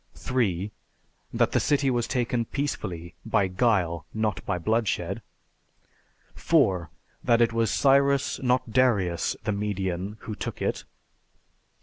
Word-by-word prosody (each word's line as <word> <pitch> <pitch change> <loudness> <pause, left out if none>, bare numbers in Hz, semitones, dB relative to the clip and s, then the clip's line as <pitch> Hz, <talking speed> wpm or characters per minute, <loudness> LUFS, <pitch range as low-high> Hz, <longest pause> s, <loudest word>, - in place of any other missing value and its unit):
3. 105 -6 -1 0.6
That - - +2
the - - +2
city 140 -2 +2
was 120 -2 0
taken 120 -2 0
peacefully, 90 - -4
by 100 -2 +2
guile, 90 -6 +1
not 110 -1 -1
by 90 - 0
bloodshed. 110 +2 -1 1.1
4. 95 - +2 0.3
That 120 -2 +4
it 115 -1 +3
was 115 -1 +1
Cyrus, 140 +3 +3
not 125 -2 +1
Darius 105 -10 +2
the 105 - 0
Median, 100 -1 -2
who 110 - -6
took - - -5
it. - - -2
110 Hz, 120 wpm, -26 LUFS, 95-125 Hz, 1.1 s, That